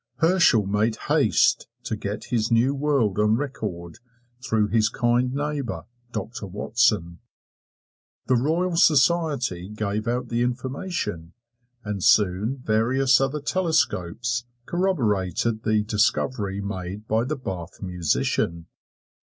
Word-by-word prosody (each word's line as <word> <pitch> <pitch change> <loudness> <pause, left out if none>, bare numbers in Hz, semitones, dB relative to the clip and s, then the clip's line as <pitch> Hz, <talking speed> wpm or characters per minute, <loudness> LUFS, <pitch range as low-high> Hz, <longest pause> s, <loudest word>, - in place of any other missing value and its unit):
Herschel 165 - +4
made 105 +3 +1
haste - - +3 0.2
to 115 - -3
get 105 0 -5
his 115 -1 +1
new 120 +4 +3
world 135 -8 +1
on 105 +1 +3
record 105 - -5 0.4
through 110 -5 +1
his 110 0 +2
kind 120 +1 +1
neighbor, 145 -1 -3 0.3
Doctor 110 -1 -5
Watson. 105 -3 0 1.1
The 130 - +1
Royal 165 +8 +1
Society 145 - +2
gave 105 0 -3
out 120 +1 -1
the 120 0 0
information, 125 - -3 0.5
and 105 -3 -4
soon 105 +6 +2
various 125 +4 +3
other 135 +2 -1
telescopes 125 - 0 0.2
corroborated 115 - 0
the 110 -1 +1
discovery 105 -1 0
made 100 +1 -6
by 110 +1 +1
the 145 +4 -3
Bath 95 -8 -6
musician. 85 -1 -1
115 Hz, 110 wpm, -24 LUFS, 100-135 Hz, 1.1 s, Herschel